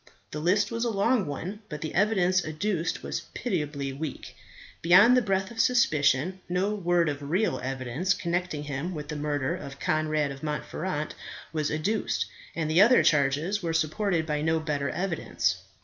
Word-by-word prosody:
The 150 - -4
list 200 +6 +2
was 230 0 -2
a 240 - +1
long 215 -1 +1
one; 175 +8 -5
but 150 -2 -6
the 155 - -4
evidence 185 -2 +2
adduced 165 +3 -2
was - - -4
pitiably 150 - -2
weak. 145 0 -6 0.5
Beyond 195 +9 +7
the 250 - +4
breath 195 -2 -1
of 230 - -9
suspicion, 160 - +2
no 185 +4 0
word 175 -4 +1
of 145 -1 -4
real 175 -6 +1
evidence 135 +8 -1
connecting 170 -3 -2
him 150 +5 -4
with 150 -1 -6
the 150 - -3
murder 145 -2 -1
of 135 0 -9
Conrad 155 -2 0
of 135 0 -9
Montferat 155 +1 -3 0.4
was 155 -2 0
adduced, 180 +9 -1 0.3
and 160 -2 -1
the 160 +4 +4
other 240 +5 +6
charges 150 +7 +2
were 165 -2 -2
supported 165 +2 0
by 150 -1 -1
no 160 +1 +1
better 145 -3 -2
evidence. 160 - -1
160 Hz, 165 wpm, -27 LUFS, 150-190 Hz, 0.5 s, Beyond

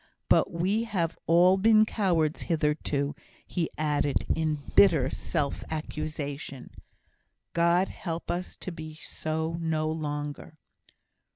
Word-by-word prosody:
But - - +5
we 190 +7 0
have 175 -7 -1
all 180 +3 +6
been 215 +2 +6
cowards 170 -8 +1
hitherto," 150 -3 0 0.3
he 170 -3 -2
added, 145 -2 +1
in 155 -2 -1
bitter 155 -9 +5
self 145 -5 -2
accusation. 155 -3 -5 0.8
"God 170 +2 +3
help 165 -2 -4
us 180 +1 -4
to 185 - -4
be 155 -2 -8
so 160 +1 -3
no 155 -1 0
longer!" 150 0 -4
160 Hz, 110 wpm, -28 LUFS, 150-175 Hz, 0.8 s, all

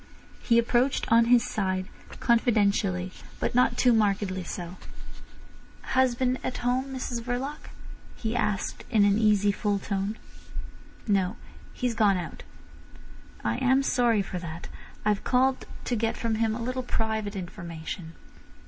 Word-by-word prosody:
He 235 - +3
approached, 240 +3 +2
on 230 0 +6
his 240 0 +5
side, 185 -2 -1 0.3
confidentially, 200 -6 +2 0.3
but - - -1
not 245 0 +3
too 250 -2 +5
markedly 200 -3 +1
so. 175 +1 -6 1.1
"Husband 255 0 +1
at 255 - -3
home, 250 +2 +2
Mrs 255 -3 -4
Verloc?" 255 +5 -4 0.5
he 225 0 -3
asked 210 -5 -1
in 215 -4 +4
an 205 +1 +3
easy, 205 -2 +4
full 205 0 0
tone. 200 +2 -2 0.9
"No. 195 -1 +2 0.4
He's 245 -2 -1
gone 210 -4 +3
out." 175 -2 -6 1.0
"I - - 0
am 265 +1 +3
sorry 235 -6 +2
for 185 -1 -5
that. 170 -1 -7 0.4
I've 210 -1 +1
called 260 +1 +2 0.2
to 245 - 0
get 225 0 -1
from 230 -1 -1
him 220 0 +1
a 235 - -5
little 255 +2 -2
private 220 -4 -2
information." 170 -2 -6
220 Hz, 135 wpm, -27 LUFS, 195-245 Hz, 1.1 s, on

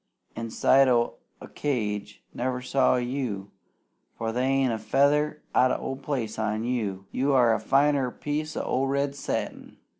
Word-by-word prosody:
Inside 115 +4 +3
o' 120 -2 +2 0.3
a - - -10
cage 105 -7 -3
never 125 +1 -2
saw 130 +1 +2
you, 120 -6 -3 0.7
for 115 0 -2
they 125 +3 0
ain't 135 -2 +2
a 110 - -3
feather 145 +7 +2
out 130 - +5
o' 135 - -2
place 130 -6 -3
on 110 0 -1
you. 105 -6 -2
You 135 +2 +1
are 120 -4 +5
finer'n 140 -1 +2
a - - -5
piece 155 +3 -4
o' 130 - 0
red 140 +1 0
satin. 140 - -4
130 Hz, 150 wpm, -26 LUFS, 115-140 Hz, 0.7 s, out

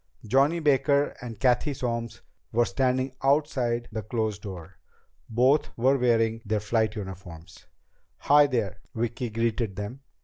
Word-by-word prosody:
Johnny 140 +9 +3
Baker 140 -1 +2
and 115 -4 -8
Cathy 130 +4 +2
Solms 115 -2 -4 0.3
were 120 +1 +3
standing 130 0 0
outside 135 -4 +1
the 110 0 -3
closed 110 -1 -2
door. 90 -3 -9 0.5
Both 130 +6 +2
were 130 +3 +3
wearing 115 -2 +2
their 110 -1 -1
flight 110 +1 0
uniforms. 90 -4 -9 0.5
"Hi, 145 0 +5
there," 105 -8 -2 0.2
Vicki 120 +2 -2
greeted 115 -2 -1
them. 105 +7 -6
115 Hz, 130 wpm, -26 LUFS, 110-130 Hz, 0.5 s, Hi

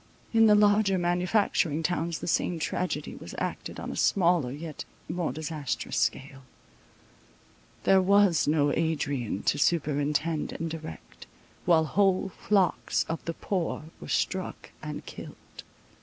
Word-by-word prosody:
In 225 -1 +6
the 210 - +7
larger 205 -1 +4
manufacturing 175 -2 +1
towns 170 -1 -1
the - - -7
same 175 +1 +1
tragedy 180 +3 -2
was - - -9
acted - - -4
on - - -5
a - - -6
smaller, 175 -8 +2
yet 155 +2 -6 0.2
more 170 0 -2
disastrous 155 -4 -4
scale. 135 +4 -1 1.4
There 190 0 +5
was 195 -4 +4
no 145 -1 +3
Adrian 145 - -1
to 145 - +1
superintend 150 0 0
and 165 0 -4
direct, 155 - -9 0.4
while 165 -2 +4
whole 190 +4 +2
flocks 195 -1 +1
of 165 - -4
the 165 - -3
poor 180 -5 -2 0.2
were 75 - -8
struck - - -2
and - - -6
killed. - - -9
165 Hz, 130 wpm, -28 LUFS, 150-185 Hz, 1.4 s, the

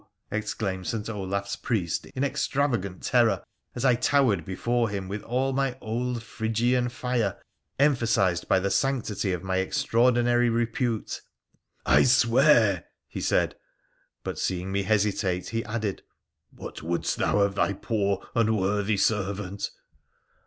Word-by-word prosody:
' - - -47
exclaimed 105 -3 -3
St. 110 -2 -3
Olaf's 100 -1 -3
priest 90 -8 -2
in 130 - -4
extravagant 135 -8 -1
terror, 115 -6 +3 0.3
as 120 - -2
I 125 - +6
towered 120 - +2
before 115 +5 0
him 100 -2 -4
with 100 +2 -4
all 130 +3 -1
my 135 -1 0
old 120 +1 -3
Phrygian 120 +3 0
fire 120 -4 -1 0.4
emphasised 115 -11 +2
by - - +4
the 100 +1 -1
sanctity 110 -7 0
of 90 0 -3
my 95 0 -1
extraordinary 120 +5 +2
repute. 115 0 -1 0.3
' - - -45
I - - +5
swear! 120 - +4
' - - -59
he - - -2
said; - - +1 0.7
but, - - -4
seeing 95 +1 -2
me 100 +1 +1
hesitate, 100 -3 0
he 115 0 -2
added, 105 -2 -3 0.3
' - - -57
What - - -9
wouldst 85 +2 -1
thou - - +1
of 100 -1 +2
thy 100 - +1
poor, 100 -1 -1
unworthy 105 -2 +1
servant 100 -1 -1
110 Hz, 140 wpm, -26 LUFS, 100-120 Hz, 0.7 s, I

